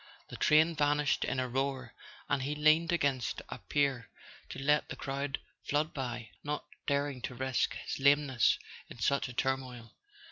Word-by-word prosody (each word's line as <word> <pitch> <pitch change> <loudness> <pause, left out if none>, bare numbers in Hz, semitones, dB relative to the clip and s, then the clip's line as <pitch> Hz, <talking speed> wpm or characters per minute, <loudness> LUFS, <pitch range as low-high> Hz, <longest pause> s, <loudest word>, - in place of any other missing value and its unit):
The - - -7
train 160 +2 +4
vanished 145 -1 +2
in 130 - -1
a 130 - 0
roar, 130 -1 -2 0.3
and 140 -2 +1
he 145 +3 -2
leaned 155 +3 +4
against 140 -8 0
a - - -6
pier 140 -5 0 0.4
to - - -7
let 150 +2 +2
the - - -5
crowd 140 0 -3 0.2
flood 150 +2 0
by, 120 -5 -4
not 150 0 -3 0.2
daring 140 -2 0
to 125 - -5
risk 130 0 0
his - - -5
lame¬ 145 +1 +6
ness 130 -4 +3 0.3
in - - -10
such 140 +5 +1
a 125 - -8
turmoil. 125 -2 -2
140 Hz, 170 wpm, -32 LUFS, 130-145 Hz, 0.4 s, lame¬